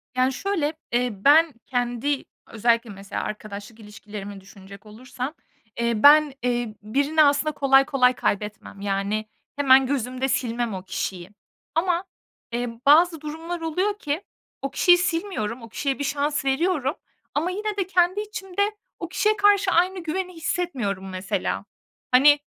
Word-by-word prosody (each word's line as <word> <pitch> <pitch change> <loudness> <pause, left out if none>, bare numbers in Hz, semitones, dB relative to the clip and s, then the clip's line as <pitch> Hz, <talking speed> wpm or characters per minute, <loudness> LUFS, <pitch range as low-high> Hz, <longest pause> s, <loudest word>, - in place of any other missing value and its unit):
Yani, 255 +1 +2
şöyle, 330 -4 -1 0.2
eee, 245 +1 +1
ben 290 +9 +5
kendi 245 +3 -1 0.2
özellikle 230 +1 +1
mesela 195 0 -6
arkadaşlık 215 +1 -7
ilişkilerimi 205 -2 -9
düşünecek 200 +1 -14
olursam, 250 +6 -6 0.5
eee, 235 -1 0
ben, 295 -1 +7
eee, 240 -3 -1
birini 285 +8 +2
aslında 290 +2 +3
kolay 275 -1 +4
kolay 255 -2 +3
kaybetmem. 210 -2 -3
Yani, 200 +2 -1 0.3
hemen 270 -2 +5
gözümde 255 0 -1
silmem 240 -4 -1
o 185 -1 -6
kişiyi. 185 -1 -4 0.5
Ama, 345 +1 +1 0.5
eee, 240 0 -2 0.2
bazı 325 +2 +5
durumlar 325 +3 -5
oluyor 375 +6 -1
ki 295 +4 -2 0.4
o 275 0 -3
kişiyi 355 +5 +5
silmiyorum, 330 - -2
o 230 - -11
kişiye 275 +4 -2
1 - - -1
şans 285 +1 -1
veriyorum 295 +1 +1 0.4
ama 335 +5 0
yine 420 +1 -3
de 380 -2 -1
kendi 370 +2 +2
içimde 405 -3 -4 0.4
o 340 - -5
kişiye 420 +3 +1
karşı 405 -2 +4
aynı 365 +2 +2
güveni 365 +3 -3
hissetmiyorum 245 - -2
mesela. 185 0 -3 0.5
Hani, 290 +3 +6
275 Hz, 140 wpm, -24 LUFS, 225-335 Hz, 0.5 s, ben